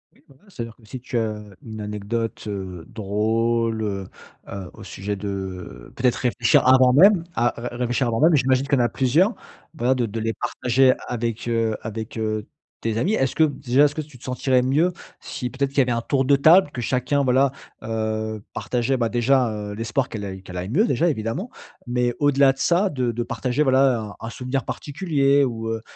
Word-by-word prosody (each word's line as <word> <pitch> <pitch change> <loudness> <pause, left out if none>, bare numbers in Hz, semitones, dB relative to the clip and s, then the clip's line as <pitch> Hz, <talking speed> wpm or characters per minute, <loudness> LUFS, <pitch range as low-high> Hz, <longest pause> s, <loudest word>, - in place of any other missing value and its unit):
Oui, - - -27
voilà, 135 -1 -22
c'est-à-dire 115 - -7
que 115 - -22
si 125 +4 -7
tu 120 0 -4
as, - - +1 0.2
heu, 105 -2 -13
une 110 -2 -7
anecdote, 105 +3 -4
heu, 95 -4 -5
drôle, 115 +1 0
heu 95 -2 -3 0.4
heu 95 -2 -7
au - - -12
sujet 100 +1 -5
de 95 -10 -6
peut-être 125 -1 +2
réfléchir 125 -3 +2
avant 130 -1 +6
même, 185 +3 +6
à 120 +1 +2 0.2
à - - -7
réfléchir 125 +1 0
avant 115 -1 -1
même. 160 +1 +5
J'imagine 130 0 +2
qu'il - - -3
y - - +4
en - - +3
a - - 0
plusieurs, 155 - +2 0.4
voilà 130 -2 +2
de 120 -3 -1
de 110 +2 -5
les 115 0 -1
partager 130 +1 +2
avec 120 -1 -3
heu, 115 -2 0
avec 110 +1 -6
heu, 110 -1 -2 0.3
tes 115 -1 -1
amis. 190 - +1
Est-ce 135 - 0
que, 160 - +4
déjà, 140 -2 +2
est-ce 145 - 0
que 155 - -6
tu 145 -4 -13
te - - -19
sentirais 130 0 +1
mieux 155 +7 +2 0.3
si 125 - -5
peut-être 135 +1 -1
qu'il 140 - -13
y - - +8
avait 125 -1 +1
un 115 0 0
tour 135 +2 0
de 140 +1 +5
table, 160 +2 +6
que 125 - -7
chacun 135 +4 0
voilà, 130 +1 +3 0.3
heu, 110 -1 -3
partageait, 125 +2 -1
bah, 115 -2 0
déjà, 125 +1 +2
heu, 105 -1 -5
l'espoir 115 +4 -1
qu'elle 105 -2 -6
aille 95 -1 -7
qu'elle 90 -1 -10
aille 90 +3 -4
mieux 210 - +2
déjà 175 - +1
évidemment, 135 - -3 0.4
mais 120 0 0
au-delà 140 -2 +4
de - - -23
ça 180 +6 +2
de 125 -5 -1
de 120 +1 -3
partager, 130 +4 -2
voilà, 130 -3 +3
un 105 -1 -8
un - - -4
souvenir 130 +3 -3
particulier 145 -3 +1
ou, 115 -3 -3
heu 115 0 -3
120 Hz, 210 wpm, -23 LUFS, 110-135 Hz, 0.4 s, y